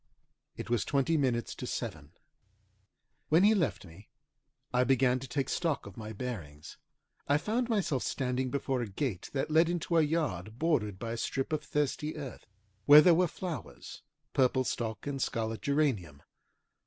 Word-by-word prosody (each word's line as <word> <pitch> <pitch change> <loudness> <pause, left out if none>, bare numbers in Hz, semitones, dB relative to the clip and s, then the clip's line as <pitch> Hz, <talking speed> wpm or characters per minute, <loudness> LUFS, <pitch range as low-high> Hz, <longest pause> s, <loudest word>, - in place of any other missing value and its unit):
It - - -6
was 120 -4 +2
twenty 140 +3 +1
minutes 125 -6 0
to - - -7
seven. 75 -1 -5 1.2
When 165 +4 +5
he 210 +2 +6
left 170 - 0
me 90 +5 -15 0.6
I 125 0 +4
began 130 -1 +3
to 135 - -8
take 135 0 -1
stock 165 -5 -1
of 100 - -10
my 110 -1 -7
bearings. 95 - -7 0.5
I 145 - +4
found 230 +9 -1
myself 190 - 0
standing 130 -1 -1
before 135 -1 -1
a 120 - -3
gate 100 -2 -3
that 140 +2 -1
led 160 +2 +5
into 170 -1 0
a - - +6
yard 140 - -1
bordered 125 - 0
by 115 +3 -5
a 115 - -3
strip 135 +5 -2
of 155 - -1
thirsty 150 +1 -2
earth, 135 -6 -8 0.4
where 150 +1 +11
there 175 +2 +6
were 180 +2 +3
flowers, 165 - -7 0.3
purple 130 0 +3
stock 110 -4 -3
and 140 -2 -3
scarlet 110 -2 -2
geranium. 125 - 0
135 Hz, 165 wpm, -31 LUFS, 115-155 Hz, 1.2 s, where